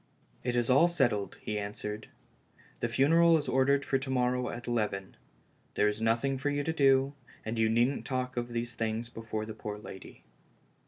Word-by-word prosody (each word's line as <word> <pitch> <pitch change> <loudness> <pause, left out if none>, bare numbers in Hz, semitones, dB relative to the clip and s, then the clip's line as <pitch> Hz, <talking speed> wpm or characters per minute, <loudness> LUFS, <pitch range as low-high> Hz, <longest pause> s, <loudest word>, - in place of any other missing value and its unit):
"It 120 -1 -1
is 120 -1 +1
all 140 +7 +6
settled," 120 - 0
he 105 0 -2
.answered; 105 +1 -5 0.7
"the - - 0
funeral 165 +7 +5
is 150 - -3
or 130 +1 +2
dered 140 0 +3
for 135 - +1
to 130 0 -6
morrow' 125 -1 +1
at 120 +1 -6
eleven. 105 -5 -2 0.6
There 105 - +3
is 105 +1 -1
nothing 120 +4 +1
for 145 +2 0
you 145 0 -1
to 160 - -1
do, 135 -2 +4 0.3
and 110 +1 -3
you 110 0 +3
needn't 120 +5 +2
talk 130 -1 -3
of 120 0 -2
these 120 0 -3
things 115 +1 -2
before 110 -2 -5
the 110 - -6
poor 105 -1 -6
lady." 95 -2 -11
120 Hz, 190 wpm, -30 LUFS, 110-135 Hz, 0.7 s, all